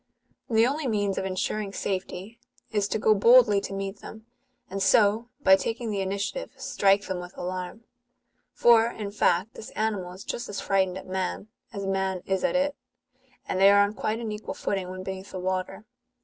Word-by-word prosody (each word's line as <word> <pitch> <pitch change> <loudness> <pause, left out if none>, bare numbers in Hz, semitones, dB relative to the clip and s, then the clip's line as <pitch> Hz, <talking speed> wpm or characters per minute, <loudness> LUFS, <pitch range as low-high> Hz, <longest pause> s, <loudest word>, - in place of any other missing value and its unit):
The 225 -1 +4
only 285 +3 -1
means 205 -4 0
of - - -3
ensuring 195 +2 -2
safety, 195 +3 -4 0.3
is 205 -2 +1
to - - -1
go 215 0 +4
boldly 215 -1 +6
to 195 - -6
meet 195 +1 -4
them, 220 0 -11 0.4
and 195 +1 -5
so, 215 +3 +3
by 190 - +8
taking 225 +4 -3
the 200 -1 -1
initiative, 200 - -3
strike 200 +1 +2
them 185 -1 -3
with 180 0 -10
alarm: 185 +4 -5 0.7
for, 230 -1 +5
in 210 -3 -5
fact, 195 0 +1
this 225 - -9
animal 210 -5 -1
is 190 - -10
just 240 - -5
as 205 - -4
fi:ightened 190 -2 +1
at 190 - -9
man, 190 +2 -3 0.2
as 200 -3 -5
man 190 -1 -1
is 190 -1 -1
at 275 - +1
it; 285 +1 +1 0.7
and 185 - -1
they 195 - +8
are 200 0 +6
on 205 +1 -1
quite 215 +1 -2
an 225 -2 -4
equal 210 +1 -6
footing 190 -2 -2
when 185 0 -7
beneath 190 +1 -6
the 185 - -6
water. 185 +2 -3
200 Hz, 190 wpm, -26 LUFS, 190-220 Hz, 0.7 s, by